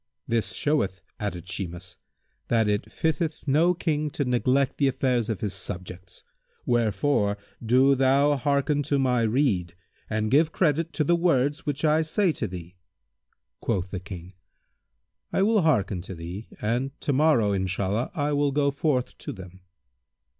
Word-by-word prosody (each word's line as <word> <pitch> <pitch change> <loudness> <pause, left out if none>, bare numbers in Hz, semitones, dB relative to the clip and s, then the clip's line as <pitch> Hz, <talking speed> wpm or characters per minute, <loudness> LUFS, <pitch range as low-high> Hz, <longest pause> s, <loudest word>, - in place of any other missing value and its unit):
"This 115 -1 0
showeth," 100 -11 0 0.2
added 95 -5 -4
Shimas, 90 0 -5 0.5
"that 115 -2 +2
it 105 +1 -1
fitteth 160 -1 -2
no 165 +6 +4
King 150 -3 -1
to 145 0 -2
neglect 130 +2 +1
the 140 - +4
affairs 125 -3 0
of 110 - -2
his 105 -3 -2
subjects; 90 -2 -7 0.4
wherefore 110 -2 +1 0.3
do 130 +4 +5
thou 135 +2 +3
hearken 140 +1 +1
to 140 0 0
my 125 -3 +2
rede 110 -7 +1 0.3
and 110 0 -1
give 155 +3 +4
credit 165 -1 +1
to 155 - +1
the 170 +4 +3
words 150 -4 +1
which 145 +2 -1
I 155 +1 +4
say 170 +4 +1
to 120 - -3
thee." 90 -1 -9 0.8
Quoth 95 -1 -2
the 95 - -3
King, 90 -1 -9 1.0
"I 190 - +2
will 215 0 +3
hearken 105 - +1
to 95 +1 -8
thee 85 +6 -7
and 125 +6 -2
to 145 - 0
morrow, 130 -7 +3
Inshallah, 95 +4 -1
I 145 -1 0
will 145 0 +2
go 140 0 +2
forth 140 -3 -1
to - - -5
them." 95 -1 -11
125 Hz, 155 wpm, -26 LUFS, 100-145 Hz, 1.0 s, do